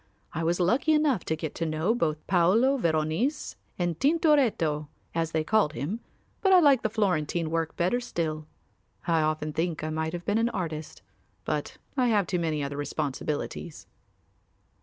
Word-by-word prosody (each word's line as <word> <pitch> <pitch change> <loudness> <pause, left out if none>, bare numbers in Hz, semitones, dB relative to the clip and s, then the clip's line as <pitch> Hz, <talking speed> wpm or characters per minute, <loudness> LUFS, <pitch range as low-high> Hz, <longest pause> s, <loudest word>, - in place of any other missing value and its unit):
I 165 - -2
was 170 +2 +1
lucky 245 - +3
enough 300 - +2
to 160 - 0
get 160 -1 -5
to - - -3
know 160 +7 +1
both 155 -9 -1
Paolo 195 +10 +4
Veronese 165 - 0 0.2
and 175 -3 -1
Tintoretto 270 - +2 0.3
as 165 -1 -1
they 160 -1 0
called 205 -3 +2
him, 155 - -3 0.4
but 385 - +3
I 370 - +8
like 285 -6 +5
the 220 - 0
Florentine 175 -6 0
work 165 -1 -1
better 180 +8 +1
still. 155 -10 -3 0.6
I 165 -2 +2
often 155 0 -1
think 165 -1 -2
I 155 - -2
might 160 +1 -2
have 175 0 -5
been 205 +2 +1
an 230 +1 +2
artist, 160 -7 -5 0.4
but - - -3 0.2
I 255 -3 +2
have 210 -4 +3
too 180 - -1
many 155 -3 -1
other 140 0 -4
responsibilities." 145 +2 -4
170 Hz, 165 wpm, -27 LUFS, 155-225 Hz, 0.6 s, I